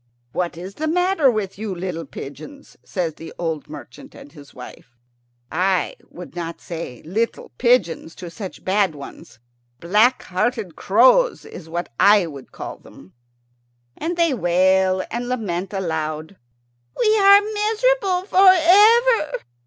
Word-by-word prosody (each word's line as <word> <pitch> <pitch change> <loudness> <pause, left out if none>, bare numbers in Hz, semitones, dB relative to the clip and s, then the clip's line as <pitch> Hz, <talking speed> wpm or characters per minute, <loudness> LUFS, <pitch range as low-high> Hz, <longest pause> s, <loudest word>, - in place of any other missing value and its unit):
"What 175 +2 -3
is 185 +3 -8
the 315 +8 -4
matter 360 -3 +2
with 205 -4 -3
you, 210 -3 -4
little 170 -3 -5
pigeons?" 275 - -11
said 170 -5 -4
the 165 0 -10
old 160 -4 -4
merchant - - -12
and 145 - -13
his 145 -3 -15
wife. 125 -1 -13 0.5
I 185 +3 0
would 180 0 -11
not 170 -1 -5
say 160 -8 -8
"little 220 +8 -3
pigeons" 185 -10 +1
to 175 -2 -9
such 190 0 -9
bad 190 -3 +1
ones. 140 -4 -12 0.4
Black 215 +9 +2
hearted 205 -1 -2
crows 255 - +3
is 165 - -11
what 175 +2 -4
I 205 -2 +5
would 140 -5 -10
call - - -8
them. 95 - -17 0.8
And 340 +2 -4
they 335 -4 +2
wail 185 -1 +2
and 240 +1 -4
lament 195 -7 -3
aloud, 160 -3 -4 0.6
"We 430 0 +3
are 400 0 +8
miserable 425 -2 0
for 385 0 +4
ever. 410 +1 +5
195 Hz, 135 wpm, -21 LUFS, -, 0.8 s, are